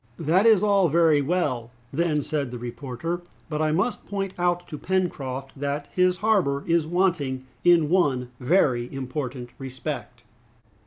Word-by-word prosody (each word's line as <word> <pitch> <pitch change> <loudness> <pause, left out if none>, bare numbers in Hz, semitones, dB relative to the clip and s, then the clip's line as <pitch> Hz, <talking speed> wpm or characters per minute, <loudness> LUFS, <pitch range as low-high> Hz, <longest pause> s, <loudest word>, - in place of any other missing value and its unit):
"That 170 +7 +3
is 215 -3 +6
all 200 -4 +4
very 160 -2 +4
well," 140 -7 -1 0.2
then 150 -1 +1
said 145 -3 -1
the 125 - -6
reporter, 130 +7 -5 0.3
"but 155 -1 -2
I 155 0 +2
must 190 +10 0
point 195 -2 -3
out 175 0 0
to 150 - -6
Pencroft 135 -8 -2
that 145 +1 -3
his 180 0 +2
harbor 175 -11 +2
is 165 -2 +2
wanting 160 -7 0 0.2
in 175 -3 +5
one 140 -8 +1
very 125 -4 +2
important 130 -2 -5
respect!" 130 -2 -6
150 Hz, 145 wpm, -25 LUFS, 130-175 Hz, 0.3 s, is